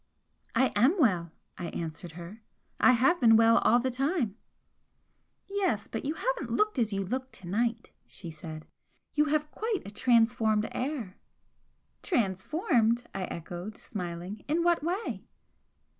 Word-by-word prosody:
"I 260 - +3
AM 250 - +4
well!" 180 - +2 0.3
I 175 - -3
answered 165 +1 -6
her 175 +6 -10 0.4
"I 255 - +6
have 270 +8 +3
been 225 -2 +7
well 230 0 +6
all 235 - +4
the 260 +1 0
time." 265 - 0 1.1
"Yes, 385 - -1
but 225 - -5
you 300 +3 -1
haven't - - -2
looked 425 -9 +1
as 225 -2 +1
you 195 -1 -1
look 260 +6 -3
to 180 - -11
night," 230 +4 -1 0.2
she 175 -3 -9
said 155 0 -9 0.5
"You 300 0 +3
have 300 0 0
quite 440 -2 -2
a 200 - -7
transformed 225 -2 +3
air!" 250 -8 -4 0.8
"Transformed?" 235 - +1
I 190 -1 -2
echoed, 175 +5 -7
smiling 180 0 -6
"In 320 +4 +1
what 345 -1 +3
way?" 370 +7 -3
230 Hz, 145 wpm, -29 LUFS, 190-295 Hz, 1.1 s, been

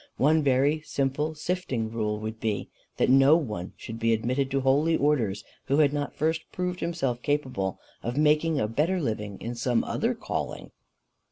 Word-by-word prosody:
One 155 +3 +4
very 140 +2 +2
simple 150 +3 -1
sifting 150 -9 -2
rule 105 -2 -1
would 110 +1 -5
be, 110 -2 -2 0.3
that - - +3
no 135 +3 +7
one 105 - -4
should 115 +1 -7
be 115 0 +3
admitted 130 +5 0
to 135 0 0
holy 145 +5 +3
orders 115 -10 +1 0.2
who 140 +1 +1
had 145 -2 +4
not 145 -1 -3
first 160 +1 0
proved 180 0 -3
himself 135 -8 -2
capable 130 -11 -1 0.2
of 120 +3 -4
making 150 +1 +3
a 105 - +1
better 155 +11 +1
living 105 - -3
in 120 - -4
some 120 0 +1
other - - -1
calling." - - -4
135 Hz, 170 wpm, -27 LUFS, 115-150 Hz, 0.3 s, no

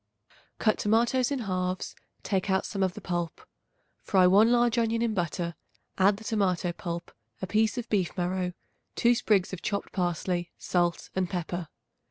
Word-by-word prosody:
Cut 215 -2 +2
tomatoes 235 +4 +2
in 280 -3 -2
halves; 185 -3 -2 0.3
take 195 0 -1
out 190 0 +2
some 195 - -3
of 185 -2 +1
the - - -8
pulp. 175 -2 -3 0.6
Fry 185 -2 +4
1 205 +5 +6
large 240 -1 +3
onion 230 0 +1
in 230 -2 +1
butter, 170 -2 -2 0.5
add 195 +1 +5
the 220 - -11
tomato 190 -6 0
pulp, 170 0 -6 0.3
a - - -3
piece 215 +5 +1
of 240 -1 -3
beef 195 -4 0
marrow, 180 0 -1 0.4
2 240 +1 +4
sprigs 205 -5 +1
of 185 - -5
chopped 200 -1 -2
parsley, 175 -1 -1
salt 175 -1 0
and 185 -2 0
pepper. 175 -1 -3
190 Hz, 165 wpm, -28 LUFS, 180-220 Hz, 0.6 s, 1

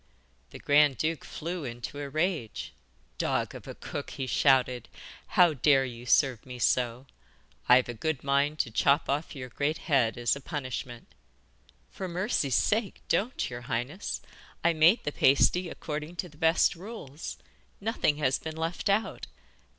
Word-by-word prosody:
The - - -10
grand 145 -1 +4
duke 160 -1 -1
flew 170 +1 -5
into 120 +3 -6
a 140 -1 -5
rage. 155 - -2 0.5
'Dog - - 0
of - - -10
a - - -7
cook,' - - -6
he 135 - -4
shouted; 130 -2 +2 0.4
'how 175 -3 +5
dare 135 0 +4
you 120 -1 -8
serve 130 -3 +3
me 125 -1 -9
so? 125 +1 +1 0.6
I've 125 0 +6
a 120 - -4
good 140 +5 -2
mind 140 +2 +1
to 115 - -6
chop 140 +6 +3
off 145 +3 -2
your 130 -2 -7
great 145 +5 -1
head 125 -8 +1
as 120 +2 +1
a 140 - -8
punishment.' 130 -5 -6 0.8
'For 190 - -5
mercy's 175 - 0
sake, 215 -1 0
don't, 240 +6 0
your 120 -1 -7
highness! 125 - -3 0.4
I 170 - +4
made 165 +8 +5
the 145 - -2
pasty 170 +7 +3
according 155 +2 -5
to 180 0 -4
the 150 - -19
best 160 +1 +3
rules; 170 - -8 0.4
nothing 200 -8 0
has 135 -3 +1
been 160 0 -6
left 165 +4 -2
out. 210 +3 0
145 Hz, 160 wpm, -29 LUFS, 130-165 Hz, 0.8 s, I've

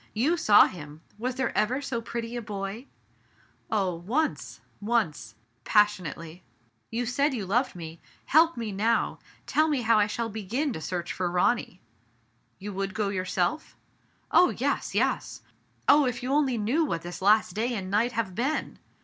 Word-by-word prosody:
You 275 +11 +2
saw 215 -11 +6
him! 150 -3 -8 0.2
Was 250 +2 -2
there 265 - -2
ever 230 +6 +1
so 265 -5 -3
pretty 235 0 -5
a 240 - -3
boy? 210 +3 -6 0.8
Oh! 195 -4 +1
once 225 - -2
— - - -37
once— 145 - -1 0.3
pas 210 - +5
pionately 165 -3 -8 0.2
— 120 -1 -39
" 115 - -45
you 235 +2 -1
said 275 +4 +1
you 210 -5 -3
loved 240 +5 0
nie! 165 -1 -8 0.3
Help 325 0 +4
me 225 -3 -3
now! 220 +4 0 0.3
Tell 310 +1 +2
me 285 -5 0
how 225 -1 +4
I 205 - +3
shall 230 +2 -2
begin 225 +7 -2
to 160 - -6
search 175 0 -3
for 180 -1 -1
Ronny.'* 180 +1 0 0.8
"You 205 +1 -7
would 195 0 -3
go 210 -2 0
yourself?" 185 - -2 0.5
"Oh, 360 - +6
yes, - - -2
yes! - - -1 0.4
Oh, 290 -2 +6
if 245 0 -3
you 260 +2 -1
only 275 -4 +2
knew 235 +10 +1
what 170 - -2
this 175 +1 -7
last 210 -1 +4
day 235 +4 -1
and 190 -2 -5
night 230 +4 +2
have 220 -5 -2
been 265 +10 -2
215 Hz, 175 wpm, -27 LUFS, 185-250 Hz, 0.8 s, saw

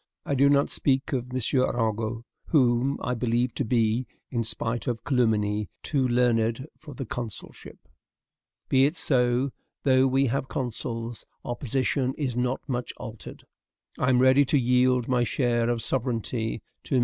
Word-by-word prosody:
I - - -1
do 140 +1 +4
not 140 0 +3
speak 135 -1 +1
of 125 -1 -2
M. 130 - -1 0.2
Arago, 115 -1 -1 0.2
whom 130 -2 +2
I 125 - 0
believe 120 0 0
to - - -2
be, 115 0 +1 0.2
in 115 -2 0
spite 115 +2 -3
of 115 -2 -2
calumny, 105 - +1
too 135 -4 +1
learned 120 0 +1
for 150 -3 -12
the 135 - -5
consulship. 115 -1 -7 0.9
Be 135 0 +4
it 160 +4 -5
so. 125 -2 +2 0.3
Though 130 -1 +4
we 135 +1 +2
have 130 +1 -1
consuls, 115 -3 -4 0.2
our 120 - -2
position 130 +1 -1
is 135 -5 -2
not 125 +1 -1
much 125 -3 -3
altered. 115 -1 -9 0.6
I 125 - +2
am 125 - +4
ready 130 +2 +5
to 145 - +2
yield 125 -1 +3
my 125 -1 +2
share 120 -1 +1
of 120 -1 -1
sovereignty 115 -3 -2 0.2
to - - -1
MM. - - +4
125 Hz, 160 wpm, -26 LUFS, 115-130 Hz, 0.9 s, ready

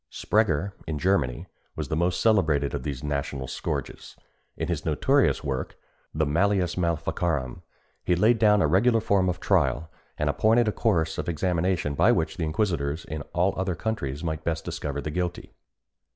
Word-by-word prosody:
Sprenger, 100 -4 +1 0.2
in 80 - -2
Germany, 75 -7 0 0.3
was - - -4
the - - 0
most 85 +2 0
celebrated 80 -11 +2
of 70 - -2
these 70 0 -5
national 70 -2 -3
scourges. - - -5 0.4
In - - -2
his 85 -3 -2
notorious 135 - +2
work, 65 -3 -3 0.3
the 80 0 0
Malleus 90 +4 +1
Maleficarum, 85 -5 -1 0.4
he 90 - +2
laid 110 +6 +3
down 105 -2 +5
a - - +3
regular 115 +8 +3
form 100 -4 +2
of 90 0 -2
trial, 80 -6 +1 0.3
and 75 - -1
appointed 110 +11 +3
a - - +2
course 80 -9 0
of - - -3
examination 85 -1 0
by - - +4
which 80 +4 0
the 85 - -2
inquisitors 80 -3 -1
in 80 -1 -5
other 95 +1 +1
countries 80 -9 -3
might 80 -2 -3
best 80 0 -2
discover 70 -1 -4
the 75 - -4
guilty. 90 +1 -3
85 Hz, 165 wpm, -26 LUFS, 75-95 Hz, 0.4 s, down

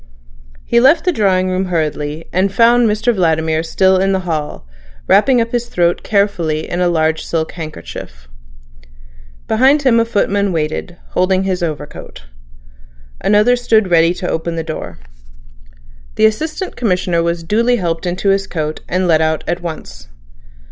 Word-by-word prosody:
He 235 - +3
left 275 +9 +4
the 360 - +3
drawing 185 - +1
room 185 +1 -1
hurriedly, 155 -2 -3
and 190 +2 +1
found 235 +2 +4
Mr 220 +3 +1
Vladimir 160 -4 +1
still 190 +3 +2
in 195 +1 +1
the 190 - 0
hall, 155 - -4 0.4
wrapping 250 +4 +4
up 230 0 -1
his 240 0 -2
throat 175 -6 0
carefully 180 -7 0
in 175 - -3
a 180 - +2
large 160 -1 0
silk 160 -1 -2
handkerchief. - - -9 1.2
Behind 265 +6 +3
him 240 -4 +4
a 230 - +2
footman 205 -3 0
waited, 160 +2 -3
holding 185 +1 +1
his 190 -1 -2
overcoat. 150 - -6 1.0
Another 210 +4 +4
stood 220 -5 +1
ready 165 +1 +4
to 180 - -5
open 165 0 -3
the 165 - -3
door. 155 -1 -7 1.2
The 220 - +3
Assistant 310 - -2
Commissioner 180 -6 0
was 170 0 -2
duly 230 +7 +1
helped 170 -4 -2
into 180 +3 -1
his 195 0 +1
coat, 155 -2 -4
and 185 +1 0
let 160 -2 +3
out 160 0 0
at 175 +1 -2
once. 65 - -8
180 Hz, 155 wpm, -16 LUFS, 160-215 Hz, 1.2 s, left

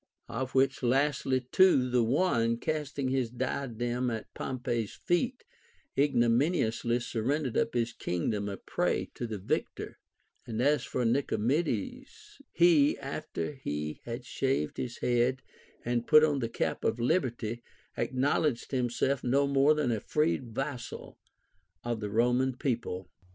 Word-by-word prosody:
Of 130 0 -4
which 135 0 +3
last 135 +4 +1 0.2
two, 180 -9 +5
the 125 -1 +4
one, 115 -2 +2
casting 145 -2 -2
his 130 -3 0
diadem 125 0 -2
at 115 -2 -5
Pompey's 120 -4 -3
feet, 245 +9 -1 0.5
ignominiously 120 -2 +2
surrendered 130 +3 -1
up - - +1
his 115 -1 0
kingdom 100 +4 -2
a 100 - -5
prey - - -1
to 120 - -4
the 110 -2 -4
victor; 95 - -3 0.5
and 115 -2 -4
as 145 +4 +3
for 125 - -2
Nicomedes, 175 - -1
he, 165 -4 +5
after 150 +2 -4
he 75 - -4
had 120 +1 -5
shaved 130 - -1
his 120 -1 -4
head 125 +1 +1 0.4
and 120 0 -1
put 155 -1 +7
on 145 -3 +2
the 115 -3 -2
cap - - -2
of 120 - 0
liberty, 120 -4 0 0.3
acknowledged 135 -1 0
himself 130 +1 0
no 140 +3 +3
more 140 +2 +4
than 150 -5 +1
a 110 - 0
freed 150 +2 0
vassal 135 -3 -5 0.6
of 120 -2 -2
the 105 -1 -4
Roman 125 +4 +2
people. 115 -9 -3
125 Hz, 135 wpm, -30 LUFS, 115-140 Hz, 0.6 s, put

